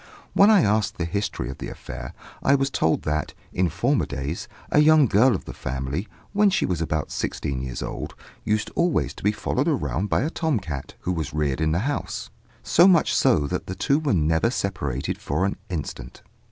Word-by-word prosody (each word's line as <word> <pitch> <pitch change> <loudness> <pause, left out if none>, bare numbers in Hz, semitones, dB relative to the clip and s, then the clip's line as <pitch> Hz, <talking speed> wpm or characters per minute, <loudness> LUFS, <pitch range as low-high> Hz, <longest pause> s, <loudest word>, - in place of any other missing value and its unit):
When 200 - +6
I 205 -6 +6
asked 105 +1 +1
the 85 - -1
history 85 -5 -2
of 65 - -11
the - - -5
affair, - - -8 0.3
I 140 - +4
was 135 0 0
told 80 - +1
that, 75 0 -2 0.2
in 90 -1 +2
former 130 - +1
days, 70 +3 -4 0.2
a - - +5
young 155 -1 +6
girl 115 +2 +4
of - - -6
the - - -7
family, 70 - -3 0.3
when 205 0 +5
she 190 - +1
was 90 -3 -1
about 80 -2 -2
sixteen 65 -2 -3
years 65 -2 -4
old, - - -5 0.3
used 105 0 0
always 150 - +1
to - - -13
be 105 - +4
followed 105 - -1
about 100 +6 0
by - - +2
a 155 - -1
tom 160 -9 0
cat, 75 -8 -6
who 90 - -1
was 80 -4 -3
reared 75 -1 0
in 80 0 +2
the 80 - +1
house, 145 0 -3 0.3
so 175 +3 +6
much 180 -4 +4
so 75 - +3
that - - -3
the 95 - -4
two 140 +9 +2
were 145 -9 +1
never 80 +5 +2
separated 70 - -2
for 95 - -1
an 100 - -1
instant. 70 -7 -6
95 Hz, 205 wpm, -24 LUFS, -, 0.3 s, When